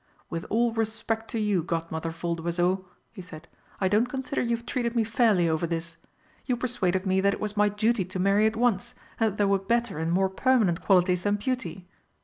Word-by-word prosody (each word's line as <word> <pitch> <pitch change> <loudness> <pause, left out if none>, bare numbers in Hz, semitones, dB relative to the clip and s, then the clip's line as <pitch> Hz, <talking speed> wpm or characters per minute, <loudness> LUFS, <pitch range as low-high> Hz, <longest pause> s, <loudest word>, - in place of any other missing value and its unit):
"With 165 +1 -4
all 235 +2 +2
respect 225 0 -2
to 230 - -2
you, 205 -4 +1
Godmother 165 -1 -3
Voldoiseau," 170 +3 -1 0.3
he 200 - -8
said, 170 -2 -11 0.3
"I 190 - +2
don't 210 +5 +2
consider 265 +1 -3
you've 235 -1 -1
treated 240 -2 -2
me 230 - +3
fairly 215 -5 +3
over 160 +1 0
this! 165 0 -4 0.5
You 250 - +1
persuaded 200 -7 -1
me 190 0 +2
that 200 +1 +2
it - - -12
was 210 0 -3
my 210 0 +3
duty 215 +1 +1
to 185 +1 -6
marry 200 +3 +3
at 220 - -1
once, 225 -4 0 0.2
and 225 -2 +3
that 205 - -11
there 205 - +2
were 195 0 +3
better 230 -3 -1
and 160 +1 -1
more 190 +2 +3
permanent 205 -4 +2
qualities 180 -2 +3
than 205 +2 +1
beauty. 205 -6 -4
200 Hz, 200 wpm, -27 LUFS, 175-225 Hz, 0.5 s, me